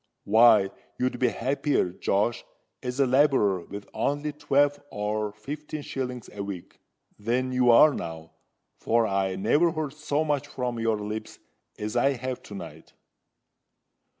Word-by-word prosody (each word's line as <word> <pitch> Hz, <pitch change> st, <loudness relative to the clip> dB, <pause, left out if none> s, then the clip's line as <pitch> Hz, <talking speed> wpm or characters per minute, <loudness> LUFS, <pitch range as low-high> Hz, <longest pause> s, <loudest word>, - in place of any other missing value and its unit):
Why, 110 Hz, -2 st, +6 dB, 0.3 s
you'd 125 Hz, -1 st, -1 dB
be 125 Hz, -, +3 dB
happier, 140 Hz, -, 0 dB
Josh, 100 Hz, +5 st, 0 dB, 0.4 s
as 125 Hz, +2 st, -4 dB
a 140 Hz, -, +5 dB
labourer 130 Hz, -, +3 dB
with 100 Hz, 0 st, -8 dB
only 145 Hz, +1 st, -1 dB
twelve 145 Hz, 0 st, +2 dB
or 105 Hz, 0 st, -2 dB
fifteen 145 Hz, +7 st, -7 dB
shillings 125 Hz, -4 st, -5 dB
a 105 Hz, -, -6 dB
week, 100 Hz, -3 st, -8 dB, 0.4 s
than 125 Hz, +4 st, 0 dB
you 125 Hz, -1 st, +3 dB
are 145 Hz, +6 st, +7 dB
now;—for 80 Hz, +7 st, -3 dB
I 95 Hz, -2 st, 0 dB
never 145 Hz, -, +3 dB
heard 155 Hz, -4 st, -3 dB
so 150 Hz, 0 st, -1 dB
much 145 Hz, -3 st, -1 dB
from 125 Hz, -2 st, -3 dB
your 115 Hz, -1 st, +1 dB
lips 105 Hz, +1 st, -6 dB, 0.4 s
as 105 Hz, +2 st, -4 dB
I 135 Hz, +3 st, +3 dB
have 130 Hz, 0 st, -5 dB
to 100 Hz, -, -10 dB
night." 80 Hz, -4 st, -10 dB
120 Hz, 140 wpm, -26 LUFS, 105-140 Hz, 0.4 s, are